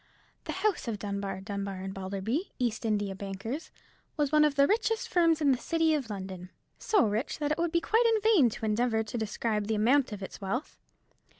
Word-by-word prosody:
The - - -3
house 410 - +1
of 225 -3 -2
Dunbar, 200 -2 -4
Dunbar, 200 -1 -4
and 190 0 -5
Balderby, 195 - -3
East 235 -3 -1
India 205 -3 0
bankers, 200 +9 -5 0.5
was 295 -2 +1
one 305 0 +5
of 300 -2 +2
the 280 0 +5
richest 445 +4 +1
firms 330 -3 +3
in 285 -2 +4
the 255 - +1
city 325 +1 +1
of 275 -6 -1
London—so 190 - -2
rich 215 +5 -1
that 295 -1 -1
it 305 - 0
would 340 -1 +1
be 340 0 +2
quite 450 +7 +3
in - - +1
vain 400 - +5
to 220 - -5
endeavour 220 +1 +1
to 220 +2 -5
describe 215 -1 -1
the 220 - 0
amount 255 +5 +3
of 200 -2 -6
its 190 - -8
wealth. 230 +9 -4
230 Hz, 200 wpm, -29 LUFS, 200-305 Hz, 0.5 s, one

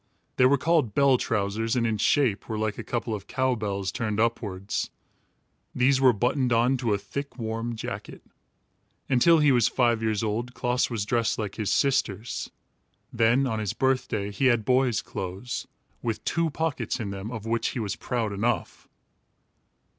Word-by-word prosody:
They 125 - +6
were 140 +2 +4
called 150 -7 +1
bell 140 -3 +4
trousers, 110 +2 -1
and 120 -2 +1
in 110 -2 0
shape 120 -3 +2
were 110 - -2
like 110 -1 -2
a - - -4
couple 120 -2 -3
of 100 -2 -6
cow 130 -1 +1
bells 100 -4 -2
turned 110 0 -2
upwards. 105 -4 -1 0.9
These 130 +1 +3
were 130 -1 +7
buttoned 125 +3 0
on 120 +3 +3
to 115 -5 +1
a - - -1
thick 140 +6 -6
warm 115 0 -3
jacket. 110 - -7 0.9
Until 150 +6 +5
he 150 -2 +4
was 120 -4 +4
five 120 -3 +2
years 110 0 0
old, 115 +4 -2
Klaas 125 0 0
was 110 -4 -2
dressed 115 +1 +1
like 105 -3 -3
his 110 -3 -2
sisters. 120 -6 0 0.6
Then, 120 +3 +3
on 110 -4 -1
his 105 -2 -2
birthday, 115 -5 0
he 105 +7 -1
had 120 -4 +2
boy's 125 -2 +2
clothes, 100 +9 -5 0.3
with 115 -2 -3
two 165 0 +1
pockets 160 -2 -2
in 105 -4 -3
them, 100 +2 -6
of 115 -3 -6
which 115 +1 0
he 130 - -3
was 105 -4 -2
proud 115 -4 -2
enough. 110 -1 -2
115 Hz, 170 wpm, -26 LUFS, 105-130 Hz, 0.9 s, were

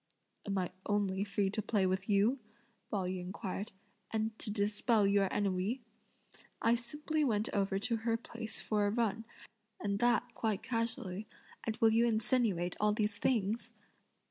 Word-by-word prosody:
"Am 200 -1 0
I 180 -1 -1 0.2
only 200 -2 +1
free 200 -1 0
to 215 - -1
play 205 -2 +1
with 190 +2 -1
you?" 210 +7 +3 0.5
Pao 200 -3 0
yü 185 0 -2
inquired, 190 +3 -4 0.4
"and 220 0 0
to - - -2
dispel 210 +1 +2
your 200 0 +4
ennui! 200 +6 0 0.8
I 230 - +4
simply 295 +6 -1
went 220 -5 +1
over 195 -1 +1
to 230 +3 0
her 225 0 0
place 230 -1 -6
for 210 -1 +2
a - - +2
run, 225 0 0 0.5
and 200 -1 -1
that 240 0 +2
quite 215 -3 -1
casually, 225 -4 -2 0.4
and 220 - -1
will 225 -1 +5
you 230 +2 +4
insinuate 220 -6 +1
all 210 0 +3
these 210 -1 -1
things?" 225 -2 0
210 Hz, 155 wpm, -34 LUFS, 195-230 Hz, 0.8 s, will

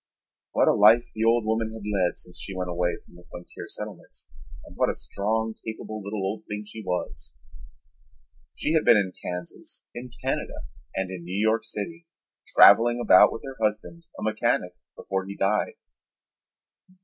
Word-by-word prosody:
What - - +3
a - - +6
life 110 +3 +5
the 110 - -2
old 115 0 +3
woman 110 0 0
had 110 -2 -9
led 100 -4 0
since 90 - -9
she 95 - -5
went 90 -1 -3
away 85 0 0
from - - -21
the 90 0 -15
frontier 85 - -9
settlement - - -8 0.5
and - - -14
what - - +2
a - - -2
strong, 110 +2 -2
capable 110 -1 -6
little 100 0 -4
old 100 +3 -2
thing 105 0 -4
she 110 +1 -9
was! 90 -2 -4 1.2
She 150 - -1
had 160 - +3
been 115 - +7
in 95 -3 0
Kansas, 90 -1 -6
in 125 +1 -7 0.2
Canada, 135 - -3 0.3
and 95 -1 -2
in 90 -2 -7
New 90 +3 -4
York 110 +1 +2
City, 165 +11 -6 0.5
traveling 120 +1 +8
about 105 -6 +7
with - - -7
her 135 -1 -8
husband, 110 +11 -2
a - - -6
mechanic, 110 -4 0 0.2
before 95 -1 -3
he 100 - -7
died. 100 +2 +1
105 Hz, 170 wpm, -26 LUFS, 95-115 Hz, 1.2 s, traveling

